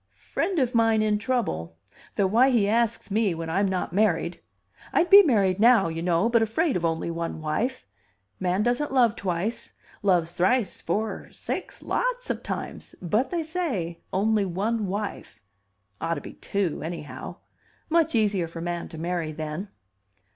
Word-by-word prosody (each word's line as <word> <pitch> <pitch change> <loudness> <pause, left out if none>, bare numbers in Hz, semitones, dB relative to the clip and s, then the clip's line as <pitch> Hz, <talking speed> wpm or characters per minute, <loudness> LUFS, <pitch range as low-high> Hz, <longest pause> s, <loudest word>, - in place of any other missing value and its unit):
"Friend 380 -2 -2
of 255 -4 +1
mine 225 -2 +3
in 210 -1 +1
trouble; 210 - -2 0.4
though 200 - +2
why 235 +7 +4
he 230 -6 +3
asks 230 -1 0
me 205 -4 +2
when 165 0 -4
I'm 195 +4 +2
not 185 -3 -2
married 215 +3 +1 0.5
I'd 350 -1 +2
be 400 +1 +12
married 205 - +2
now, 230 -5 +5
you 165 0 -4
know, 175 +4 +2
but 230 -1 +3
afraid 260 +7 +1
of 175 - -1
only 165 0 -1
one 165 -1 -4
wife. 185 +12 -2 0.5
Man 185 +2 +1
doesn't 245 +5 0
love 240 -4 +4
twice; 190 +4 -3 0.3
loves 175 -4 +2
thrice, 190 +4 +1
four, 215 +6 -2
six, - - -5
lots - - -1
of - - -4
times; - - -6
but 210 +8 0
they 340 -2 -1
say 265 - -3
only 210 +2 +2
one 200 +4 -1
wife. 200 - -5 0.6
Ought 170 - 0
to 145 - -6
be - - -9
two, 195 -6 -2
anyhow. 160 -2 -6 0.5
Much 325 -3 +2
easier 205 -6 +2
for 165 +1 -8
man 175 0 -3
to 160 - -9
marry 170 -1 -2
then." 155 +5 -5
205 Hz, 160 wpm, -26 LUFS, 170-235 Hz, 0.6 s, be